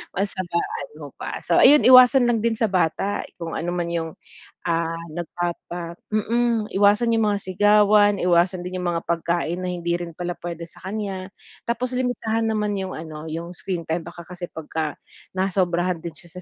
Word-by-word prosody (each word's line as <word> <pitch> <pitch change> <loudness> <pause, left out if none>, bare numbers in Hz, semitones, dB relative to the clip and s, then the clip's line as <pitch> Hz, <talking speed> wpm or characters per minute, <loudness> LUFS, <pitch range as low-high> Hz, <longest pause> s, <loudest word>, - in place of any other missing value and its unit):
Mas 195 +2 0
habaan 175 - -2
mo - - -7
pa. - - -5
So - - +1
ayun, 295 +1 +8
iwasan 255 0 +8
lang 235 - +3
din 230 0 +1
sa 225 -1 +1
bata 190 +2 0 0.2
kung 165 -1 -4
ano 175 +2 -2
man 175 -1 -2
yung, 165 -2 -3 0.5
ah, 165 -1 0 0.2
nagpapa 175 0 -4 0.2
mm, 225 +1 0
iwasan 205 +4 +4
yung 225 -2 +3
mga 205 - +1
sigawan, 205 +2 +4
iwasan 175 0 +2
din 185 0 -4
yung 180 - 0
mga 170 -1 -2
pagkain 170 +1 -1
na 185 - -2
hindi 175 -1 -2
rin 170 -2 -7
pala 175 0 -3
puwede 170 -1 -6
sa 165 - -15
kanya. 195 -3 -4 0.4
Tapos 245 +2 -1
limitahan 240 -3 -1
naman 210 -1 0
yung 190 -1 -5
ano, 155 0 -7
yung 165 +2 -5
screen 175 -2 -4
time 165 +2 -1
baka 170 0 -10
kasi 175 0 -7
pagka 155 -1 -4 0.4
nasobrahan 180 -2 0
din 170 -1 -6
siya 175 +3 -11
180 Hz, 175 wpm, -23 LUFS, 170-210 Hz, 0.5 s, ayun